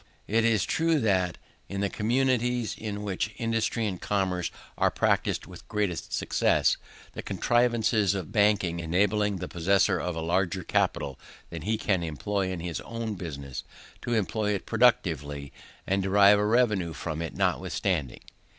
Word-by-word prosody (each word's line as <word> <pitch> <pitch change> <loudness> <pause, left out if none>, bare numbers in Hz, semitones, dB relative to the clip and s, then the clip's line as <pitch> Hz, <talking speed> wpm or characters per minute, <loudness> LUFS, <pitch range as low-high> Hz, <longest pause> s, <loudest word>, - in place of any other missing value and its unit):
It 115 +2 +2
is 115 -3 +3
true 165 -1 +2
that, 95 -7 +1 0.3
in 100 0 -3
the 100 - +2
communities 125 +1 +1
in 105 -1 -5
which 105 +2 -2
industry 115 0 0
and 95 -4 -3
commerce 95 -3 0 0.3
are - - +3
practised - - 0
with - - -13
greatest 105 -5 -2
success, - - +2 0.4
the - - -5
contrivances 115 -4 +2
of 95 -4 -5
banking 100 -5 +2
enable 95 +6 +1
the 95 -4 -4
possessor 95 +4 +2
of 90 -2 -3
a - - -3
larger 90 +2 0
capital 70 -4 0 0.3
than 85 -2 -6
he 110 +7 0
can 95 -4 0
employ 95 +4 -2
in 90 -2 -4
his 85 -1 -4
own 115 -2 -4
business, 70 -8 -6 0.4
to 120 - -1
employ 105 0 0
it 95 - -5
productively 75 - +1 0.3
and 95 +1 +1
derive 100 +1 +5
a 105 - +1
revenue 105 -7 +2
from 80 -1 -4
it 85 - -5
notwithstanding. 80 -10 -1
100 Hz, 150 wpm, -27 LUFS, 85-110 Hz, 0.4 s, derive